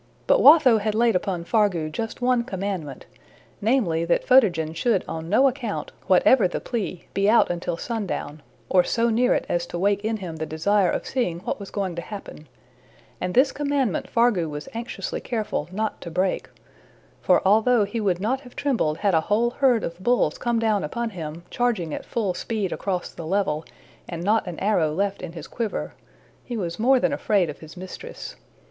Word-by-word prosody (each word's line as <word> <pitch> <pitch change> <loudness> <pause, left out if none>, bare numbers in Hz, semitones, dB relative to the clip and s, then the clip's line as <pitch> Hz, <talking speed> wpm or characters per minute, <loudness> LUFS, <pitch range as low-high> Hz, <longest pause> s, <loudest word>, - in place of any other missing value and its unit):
But - - +4
Watho 275 -6 +7
had 210 0 -1
laid 230 -1 +3
upon 180 -2 -1
Fargu 190 -5 +1
just 225 +8 -5
one 250 -1 +3
commandment, 190 - -5 0.6
namely, 200 -8 +1
that 170 - +1
Photogen 175 -12 +4
should 195 +3 +1
on 160 0 -5
no 255 +8 +5
account, 245 -5 -3 0.2
whatever 195 +4 +5
the 175 - -4
plea, 205 -7 -4
be 200 +1 +2
out 230 -4 +4
until 175 -1 -3
sundown, 195 -9 -4 0.3
or 180 -1 +4
so 230 +3 +1
near 245 +3 +3
it - - -1
as 175 0 -1
to 175 - -5
wake 200 +3 +1
in 220 +1 -1
him 175 -5 -7
the 160 0 -4
desire 185 +4 +2
of - - -2
seeing 180 -10 -2
what - - -3
was 200 - -8
going 195 -3 -2
to - - -2
happen; 195 -6 -9 0.7
and 180 0 -2
this 265 +2 +5
commandment 280 - -1
Fargu 230 -9 +2
was 150 0 -6
anxiously 230 +2 -5
careful 215 -9 -3
not 215 +3 -3
to 170 - -6
break; 185 +3 -1 0.7
for - - +4
although 220 +3 +4
he 220 +3 -3
would 185 -4 +1
not 250 +7 -1
have 250 -3 -15
trembled 225 - 0
had 200 -2 +1
a 160 - +4
whole 230 +3 +2
herd 250 -3 +2
of 170 +1 -5
bulls 205 -6 +1
come 240 -1 0
down 220 -3 +1
upon 235 +9 -3
him, 165 -2 -7
charging 215 -11 0
at - - -6
full 210 -6 -1
speed 205 0 -3
across 185 -3 -3
the 165 - -8
level, 165 -5 0 0.5
and 170 -1 -5
not 215 +1 +2
an 175 -3 -5
arrow 185 -6 +2
left 195 +4 -1
in 180 -2 -7
his 165 -3 -8
quiver, 225 +1 -4 0.5
he 240 - -5
was 170 -3 -4
more 260 +3 +4
than 285 - +1
afraid 195 - +1
of 145 - -14
his 160 +2 -12
mistress. 185 +1 -8
200 Hz, 190 wpm, -24 LUFS, 170-235 Hz, 0.7 s, Watho